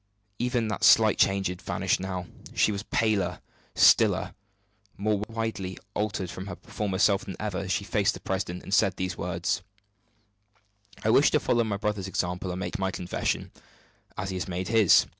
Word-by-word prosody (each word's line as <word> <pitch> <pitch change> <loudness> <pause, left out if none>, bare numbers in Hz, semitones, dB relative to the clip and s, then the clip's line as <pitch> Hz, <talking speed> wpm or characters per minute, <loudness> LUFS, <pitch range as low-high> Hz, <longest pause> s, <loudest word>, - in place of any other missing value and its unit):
Even 120 -2 0
that 105 - -3
slight 110 -1 +6
change 95 0 +3
had 90 -1 -3
vanished - - 0
now 95 -1 -4 0.3
she - - +3
was 100 -1 -3
paler, 105 -4 0 0.4
stiller, - - +5 0.6
more 105 0 0
widely 110 -5 -3 0.2
altered 105 -3 -2
from 95 +2 -7
her 90 - -5
former 105 -3 -3
self 100 0 +3
than 95 - -6
ever, 105 -3 -2
as 95 -1 -4
she 100 - 0
faced 100 -1 +1
the - - -8
president 90 -2 -3
and 95 - -6
said 100 -2 +3
these 95 -1 -3
words: 90 0 -2 1.4
"I 110 - +3
wish 140 - +6
to 150 - +2
follow 120 -3 +2
my 105 -3 -2
brother's 105 -2 -2
example 90 0 -2
and 90 +1 -4
make 100 - -4
my 95 0 0
confession, 90 -1 -2 0.7
as 95 +1 -3
he 95 - -3
has 90 - -3
made 90 +1 -3
his. 110 -5 +6
100 Hz, 180 wpm, -27 LUFS, 95-105 Hz, 1.4 s, slight